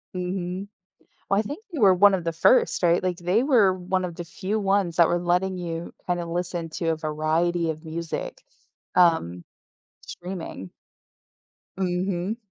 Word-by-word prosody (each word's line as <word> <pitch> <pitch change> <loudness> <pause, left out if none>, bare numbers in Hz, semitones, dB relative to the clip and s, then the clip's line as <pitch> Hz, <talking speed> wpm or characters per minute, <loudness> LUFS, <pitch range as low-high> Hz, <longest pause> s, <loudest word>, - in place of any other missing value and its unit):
Mhm. 180 +1 -3 0.6
Well, 195 - +3
I 215 - +3
think 295 - -7
they 310 - -4
were 195 -4 +6
1 200 +2 +6
of 175 -3 -2
the 165 - -1
1st 170 +5 +3
right? 170 0 +3
Like, 185 -1 -1
they 180 +7 +1
were 235 -9 +4
1 185 0 -2
of 175 -2 -4
the 175 - -5
few 195 +5 -3
ones 195 -4 +1
that 170 -2 +6
were 175 - +1
letting 180 +2 0
you 170 -1 -5
kinda 175 -1 -1
listen 175 -1 -3
to 165 +1 -3
a 160 - 0
variety 160 +2 0
of 155 +1 -7
music, 170 - -5 0.5
um, 125 - +3 0.6
streaming. 180 0 -7 1.1
Mhm. 185 +2 -1
180 Hz, 160 wpm, -25 LUFS, 170-190 Hz, 1.1 s, were